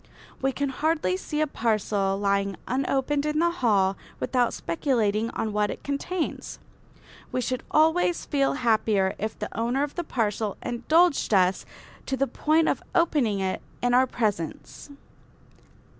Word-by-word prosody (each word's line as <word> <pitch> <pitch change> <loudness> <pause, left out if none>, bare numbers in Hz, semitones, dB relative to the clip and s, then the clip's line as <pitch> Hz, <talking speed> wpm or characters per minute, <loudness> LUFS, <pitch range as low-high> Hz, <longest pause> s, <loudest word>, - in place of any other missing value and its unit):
We 270 0 +2
can 280 +1 -2
hardly 300 - 0
see 300 +10 -3
a - - +4
parcel 210 -6 0
lying 200 -1 0
unopened 270 +2 0
in 300 0 0
a 340 +1 +3
hall 200 - +2 0.2
without 245 -2 +1
speculating 215 - 0
on 215 -1 -2
what 210 0 +1
it - - -6
contains. 310 +5 -3 0.7
We - - -1
should 255 +1 -2
always 320 +3 +2
feel 275 -2 +1
happier 220 -6 +2
if 215 +2 -3
the - - -6
owner 240 +5 0
of 290 - -3
the 345 - -3
parcel 215 - -1
indulged 280 - +2
us 185 0 +2 0.4
to 265 - -1
the 275 - +2
point 310 +3 +1
of - - 0
opening 275 - +2
it 190 -1 -2 0.2
in 245 0 +2
our 255 +1 +5
presence. 210 - -3
245 Hz, 145 wpm, -26 LUFS, 205-290 Hz, 0.7 s, our